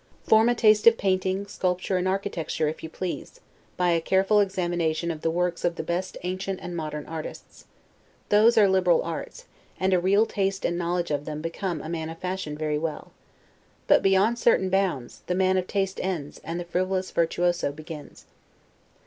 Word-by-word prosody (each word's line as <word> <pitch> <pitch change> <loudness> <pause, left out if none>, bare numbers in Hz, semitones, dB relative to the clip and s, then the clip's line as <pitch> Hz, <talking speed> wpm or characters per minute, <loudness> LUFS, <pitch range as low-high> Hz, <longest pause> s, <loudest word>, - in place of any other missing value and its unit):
Form 220 +2 +5
a 240 - +2
taste 215 -1 +4
of 230 0 +8
painting, 190 0 0
sculpture, 185 -1 -1
and 180 +1 0
architecture, 185 -5 -1
if 155 - -4
you 160 - -6
please, 185 - -6 0.4
by 180 -1 +2
a 165 -1 +2
careful 195 +4 +3
examination 175 -4 0
of 155 -2 -7
the 165 - +1
works 175 +1 -1
of 175 -1 +1
the - - -4
best 180 +3 -3
ancient 185 +1 -3
and 175 0 -6
modern 150 -2 -4
artists; 160 -1 -8 0.6
those 220 +3 +5
are 210 -2 +7
liberal 185 -2 +3
arts, - - -6 0.3
and 190 0 +2
a 180 - +4
real 200 +5 +3
taste 195 -2 -1
and 175 - 0
knowledge 175 -1 -1
of 145 0 -1
them 150 -1 -5
become 165 0 -3
a - - -6
man 160 -1 -3
of 165 - -8
fashion 180 -4 -4
very 150 -1 -1
well. 160 -1 -5 0.7
But, - - +5
beyond 195 +5 +3
certain 190 -6 +3
bounds, 185 -11 -1
the 180 - 0
man 190 0 +2
of 185 -1 0
taste 195 -1 -1
ends, 175 -6 -4
and 165 +2 -4
the 175 - -5
frivolous 185 +2 -1
virtuoso 175 -1 +1
begins. 155 0 -10
180 Hz, 185 wpm, -26 LUFS, 165-195 Hz, 0.7 s, of